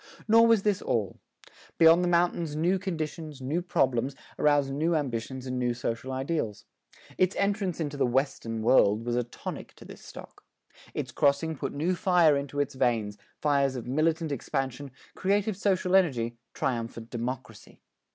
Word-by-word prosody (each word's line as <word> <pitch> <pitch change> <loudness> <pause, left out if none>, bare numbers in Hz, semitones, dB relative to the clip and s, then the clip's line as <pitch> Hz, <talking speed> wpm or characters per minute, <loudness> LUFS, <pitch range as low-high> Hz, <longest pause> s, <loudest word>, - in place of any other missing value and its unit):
Nor 230 +1 +6
was 225 -4 +4
this 210 -3 +1
all. 105 -5 -2 0.6
Beyond 165 +2 +6
the - - +1
mountains 170 -3 +1
new 175 +5 +1
conditions, 160 -5 -5
new 140 +7 -1
problems, 135 -6 0 0.2
aroused 145 -2 +3
new 160 +4 +1
ambitions 130 -2 -3
and 130 -1 -3
new 120 -1 0
social 120 +2 -4
ideals. 130 -5 -3 0.5
Its 185 0 +3
entrance 200 -3 0
into 145 -3 -3
the 135 - +2
"Western 120 -3 -1
World" 110 -2 +4
was 120 0 -1
a 125 - +2
tonic 120 - -8
to - - -14
this - - -12
stock. - - -12 0.5
Its - - -3
crossing 145 +3 +1
put - - -4
new 165 +6 0
fire 175 -4 +4
into 140 0 -3
its 145 0 0
veins 110 -5 0 0.2
fires 140 -2 +1
of 120 - -5
militant 155 +4 0
expansion, 135 0 -3 0.2
creative 200 +2 0
social 190 -2 +1
energy, 125 -11 +2 0.2
triumphant 115 -2 -3
democracy. 120 -2 -6
145 Hz, 155 wpm, -28 LUFS, 125-170 Hz, 0.6 s, Nor